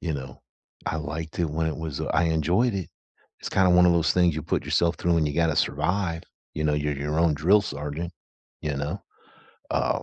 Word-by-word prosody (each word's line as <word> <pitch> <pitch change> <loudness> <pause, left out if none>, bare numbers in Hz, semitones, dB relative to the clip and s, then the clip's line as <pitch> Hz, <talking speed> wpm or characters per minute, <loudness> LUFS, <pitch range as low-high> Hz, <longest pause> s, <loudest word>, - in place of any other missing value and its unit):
you 85 - -2
know? 65 -3 -7 0.5
I - - -1
liked 80 +1 -5
it 85 - +2
when 80 +2 -1
it 80 - -2
was, 80 -4 -5
uh, - - -2
I 85 - +3
enjoyed 85 - +2
it. 95 -3 -3 0.5
It's - - -5
kinda 95 -1 +4
one 90 0 +6
of 90 - +5
those 85 -2 +2
things 90 -3 +3
you 80 - -3
put 80 - -1
yourself 85 0 +1
through 85 -1 +1
and 80 -2 +2
you 75 - -4
gotta 80 -2 +2
survive. 85 +3 0 0.3
You 75 - -2
know, 75 -1 +2
you're 75 -1 -1
your 75 +2 -2
own 85 -2 +3
drill 90 +8 +4
sergeant. 75 0 -5 0.5
You 75 -2 -2
know? 75 +8 -3 0.7
Uh, - - 0
80 Hz, 215 wpm, -25 LUFS, 75-85 Hz, 0.7 s, one